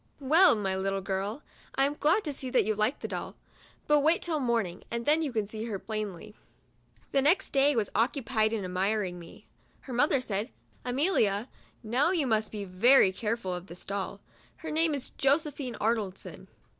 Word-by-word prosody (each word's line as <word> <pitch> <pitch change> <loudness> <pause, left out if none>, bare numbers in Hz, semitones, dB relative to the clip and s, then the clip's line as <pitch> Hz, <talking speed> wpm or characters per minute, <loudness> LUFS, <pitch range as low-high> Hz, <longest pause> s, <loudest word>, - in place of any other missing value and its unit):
" - - -36 0.2
Well, 370 -6 +7
my 195 -3 -1
little 195 +1 -1
girl, 195 +7 -3 0.3
I 270 - +3
am 285 - 0
glad 320 +8 +2
to 295 - -3
see 260 -1 -5
that 250 -5 +3
you 215 - +1
like 215 +5 0
the - - -3
doll; - - -5 0.5
but 295 0 +4
wait 320 +4 +2
till 320 -3 -1
morn 235 -5 +1
ing, 175 +2 -9
and 235 0 -3
then 305 +2 +4
you 300 -4 -1
can 220 -3 -1
see 215 +2 -6
her 215 -4 -3
plainly." 210 -1 -5 0.8
The 275 - +3
next 350 +8 +2
day 280 +1 +3
was 220 -4 0
occupied 230 -1 +1
in 215 -4 -2
admiring 185 0 -1
me. 165 -1 -13 0.4
Her 260 - -8
mother 275 +3 +3
said, 220 -1 -3 0.2
" - - -34
Amelia, 245 - +1 0.3
now 245 +8 +2
you 345 -6 +1
must 220 -3 0
be 205 -2 -5
very 195 +3 +5
care 215 +4 -2
ful 190 -5 -4
of 180 +1 -6
this 175 -1 -8
doll. 200 0 -4 0.4
Her 320 -2 -6
name 315 0 +2
is 275 - -1
Josephine 280 -3 0
Arnoldson." 215 -4 -2
230 Hz, 195 wpm, -29 LUFS, 200-280 Hz, 0.8 s, Well